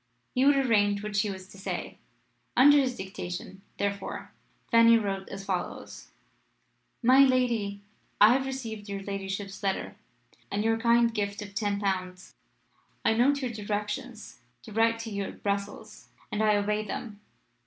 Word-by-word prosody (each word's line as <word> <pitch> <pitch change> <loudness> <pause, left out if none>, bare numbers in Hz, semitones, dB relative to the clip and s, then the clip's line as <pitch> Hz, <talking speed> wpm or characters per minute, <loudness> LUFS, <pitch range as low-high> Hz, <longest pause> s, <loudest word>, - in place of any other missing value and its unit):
He 255 - +2
would 285 0 +6
arrange 205 -6 +2
what 210 -1 -5
she 210 +1 +2
was 190 -1 -7
to 195 - -13
say. 195 - -5 0.6
Under 290 +3 +8
his 255 -3 0
dictation, 190 -1 -7 0.2
therefore, 200 -1 -3 0.4
Fanny 230 0 +7
wrote 195 -3 -3
as 195 0 -7
follows: 185 -3 -5 0.9
"My 255 +3 +6
Lady, 240 -7 +3 0.4
I 210 +3 +8
have 265 +1 0
received 225 -6 -6
your 200 -1 -4
ladyship's 195 0 -5
letter, 195 -2 -2 0.5
and 205 +1 -1
your 225 0 +1
kind 235 0 +3
gift 205 -1 -2
of 200 -1 -11
ten 205 -1 -1
pounds. 185 -2 -3 0.7
I - - +4
note 270 +5 +2
your 250 - -1
directions 210 -1 -5 0.2
to 220 - -11
write 225 +2 +2
to 225 -1 -6
you 200 -1 -2
at - - -10
Brussels, 200 0 -4 0.2
and 210 - -1
I 215 -1 +4
obey 210 +1 0
them. 210 0 -6
210 Hz, 155 wpm, -28 LUFS, 200-230 Hz, 0.9 s, Under